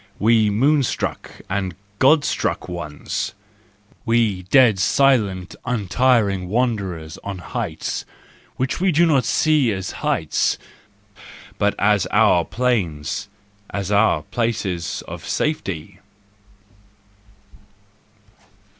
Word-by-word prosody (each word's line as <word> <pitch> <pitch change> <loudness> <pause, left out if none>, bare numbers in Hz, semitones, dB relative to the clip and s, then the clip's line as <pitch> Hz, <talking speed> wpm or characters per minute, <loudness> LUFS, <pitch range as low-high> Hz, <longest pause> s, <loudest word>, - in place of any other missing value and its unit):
We 110 0 +3
moon 140 +8 +3
struck 130 - -3 0.2
and 95 -2 -2 0.2
God 145 +2 +5
struck - - -1
ones! 85 -5 -4 0.7
We 115 -5 +1
dead 120 -7 +5
silent, 100 -4 +2
untiring 105 -4 +1
wanderers 100 -9 -2
on 100 -1 -5
heights 85 - -4 0.5
which 130 +6 -2
we 190 -1 +3
do 170 +2 +4
not 140 -7 +3
see 150 -3 +2
as 95 -2 -4
heights, 80 -2 0 1.0
but 105 0 +2
as 100 -2 +2
our - - +4
plains, 100 -6 -1 0.4
as 100 0 -4
our 100 -7 +3
places 110 -8 -2
of - - -8
safety! 100 - -3
105 Hz, 95 wpm, -21 LUFS, 95-125 Hz, 1.0 s, God